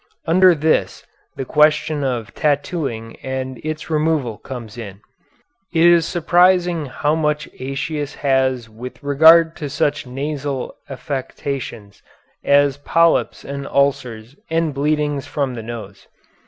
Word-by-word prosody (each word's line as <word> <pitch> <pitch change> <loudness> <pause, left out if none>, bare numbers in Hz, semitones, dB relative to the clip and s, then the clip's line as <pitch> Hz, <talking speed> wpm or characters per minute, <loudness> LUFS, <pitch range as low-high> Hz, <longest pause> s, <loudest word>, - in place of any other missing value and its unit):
Under 180 +2 +5
this 155 +1 0 0.3
the 135 - -4
question 150 +1 +2
of 120 -6 -3
tattooing 140 -6 -2
and 130 -1 -5
its 155 +1 -5
removal 150 -7 0
comes 120 -5 -8
in. 100 -5 -8 0.7
It 165 0 +3
is 170 -2 +5
surprising 175 -1 +2
how 145 +4 -1
much 150 -1 0
Aëtius 135 +2 -4
has 130 -3 +1
with 125 +4 -10
regard 160 +3 +6
to 145 - -5
such 145 0 -1
nasal 140 0 -4
affections 130 -6 -5 0.4
as 140 -1 +3
polyps 165 +3 +2
and 140 0 -5
ulcers 135 -4 -1
and 165 -2 0
bleedings 145 0 -1
from 140 -3 -2
the 115 - -6
nose. 110 -3 -9
140 Hz, 120 wpm, -20 LUFS, 130-155 Hz, 0.7 s, regard